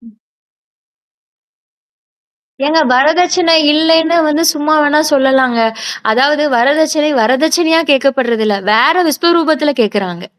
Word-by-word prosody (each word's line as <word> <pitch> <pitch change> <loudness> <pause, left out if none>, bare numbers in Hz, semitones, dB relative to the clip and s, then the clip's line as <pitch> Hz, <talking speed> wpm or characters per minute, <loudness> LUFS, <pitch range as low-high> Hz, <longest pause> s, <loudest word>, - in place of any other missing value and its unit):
ம். 225 -2 -21 2.5
ஏங்க, 315 +2 0
வரதட்சணை 335 +6 +1 0.2
இல்லைன்னு 325 +1 +1
வந்து 310 +2 -1
சும்மா 300 +1 -1
வேணா 295 +1 +1
சொல்லலாங்க! 265 -3 +1 0.5
அதாவது 290 +5 0
வரதட்சணை, 300 +4 0
வரதட்சணையா 320 +7 +1
கேட்கப்படுறதில்ல. 245 -6 -1 0.2
வேற 235 +9 +3 0.2
விஸ்வரூபத்தில 315 -1 0
கேட்கறாங்க. 195 -4 -4
295 Hz, 85 wpm, -12 LUFS, 250-320 Hz, 2.5 s, வேற